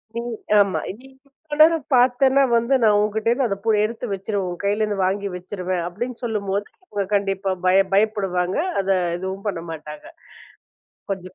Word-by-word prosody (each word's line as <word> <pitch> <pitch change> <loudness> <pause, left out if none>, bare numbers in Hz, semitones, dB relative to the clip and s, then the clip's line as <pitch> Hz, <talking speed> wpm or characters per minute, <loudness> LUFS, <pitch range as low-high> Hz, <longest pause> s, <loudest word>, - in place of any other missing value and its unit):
நீ 235 - -2 0.4
ஆமா. 200 -2 +2 0.2
"நீ 265 - -16 0.2
இவ்வளவு 295 +2 -9
நேரம் 325 -2 +5
பார்த்தேன்னா 260 +2 +4
வந்து 235 +4 +2
நான் 210 -2 +5
உன்னிடம் 215 +2 -1
இருந்து 260 +2 +1
அதைப் 200 -2 -4
பு - - +1
எடுத்து 225 +2 -3
வச்சிருவேன். 195 0 -2
உன் 175 - -6
கையில 205 +2 +1
இருந்து 210 -1 -1
வாங்கி 200 +2 -1
வச்சிருவேன்" 180 -1 -3
அப்படின்னு 235 +7 -5
சொல்லும்போது, 205 -3 -2 0.2
அவங்க 200 -2 -2
கண்டிப்பா 195 -1 -1
வந்து 180 -1 -11
பயப் 190 +1 +4
பயப்படுவாங்க. 195 -3 +1 0.2
அதை 195 0 +1 0.2
எதுவும் 190 +2 -6
பண்ண 180 -5 -2
மாட்டாங்க. 150 -1 -9 1.1
கொஞ்சம் 185 -1 -5
200 Hz, 165 wpm, -22 LUFS, 190-230 Hz, 1.1 s, நேரம்